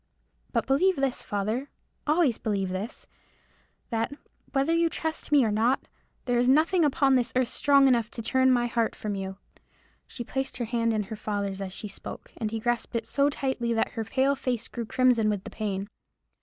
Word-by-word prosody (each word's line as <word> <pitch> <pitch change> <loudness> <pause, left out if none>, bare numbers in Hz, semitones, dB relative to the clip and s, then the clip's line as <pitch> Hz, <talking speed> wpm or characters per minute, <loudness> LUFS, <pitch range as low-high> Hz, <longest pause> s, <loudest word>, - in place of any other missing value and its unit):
But - - 0
believe 365 +8 +3
this, 270 -3 0
father,—always 250 - -1
believe 200 -3 -1
this,—that, 225 +3 -7 0.4
whether 275 +4 +2
you 335 0 +3
trust 320 -1 -3
me 285 -4 +6
or 215 - +1
not, 230 +5 +1 0.4
there 245 -1 +2
is 245 +1 +3
nothing 325 +6 +4
upon 280 -2 +3
this 245 -2 +2
earth 255 -2 +2
strong 280 -1 +4
enough 235 -3 +2
to 230 - -6
turn 260 +3 +3
my 245 -2 +3
heart 230 -1 0
from 210 -1 -4
you." 190 -1 -5 0.7
She 240 - -6
placed 265 +2 -3
her 240 - -2
hand 230 0 0
in 215 -1 0
her 210 +3 -7
father's 200 -2 -3
as 190 -1 -4
she 210 - -6
spoke, 195 - -9
and 220 - -2
he 225 +1 -3
grasped 240 +1 -1
it 230 - -1
so 280 0 +2
tightly 265 -4 -1
that 225 - +1
her 225 - -3
pale 265 +5 +1
face 250 -4 -2
grew 235 -2 -5
crimson 245 -4 +3
with 205 -2 -1
the - - -8
pain. 200 -2 -3
240 Hz, 185 wpm, -27 LUFS, 215-270 Hz, 0.7 s, me